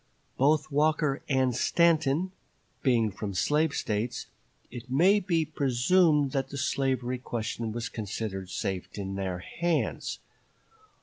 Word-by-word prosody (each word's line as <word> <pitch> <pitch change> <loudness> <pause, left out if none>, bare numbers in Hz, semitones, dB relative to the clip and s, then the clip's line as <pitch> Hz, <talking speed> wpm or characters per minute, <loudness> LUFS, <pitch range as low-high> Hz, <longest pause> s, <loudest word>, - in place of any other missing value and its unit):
Both 150 +2 +2
Walker 150 -1 +2
and 130 -3 +2
Stanton 165 +3 +2 0.5
being 115 -5 +2
from 100 0 -5
slave 150 - +2
States, 115 +4 -2 0.5
it 120 0 -9
may 180 +10 +5
be 170 -5 +1
presumed 145 +2 +3
that 135 0 -1
the 140 - -6
slavery 130 -1 0
question 115 -2 -3
was 115 +1 -3
considered 100 -3 -5
safe 95 -1 -3
in 95 -1 -4
their 95 -2 -2 0.2
hands. 170 -2 0
130 Hz, 120 wpm, -28 LUFS, 115-155 Hz, 0.5 s, may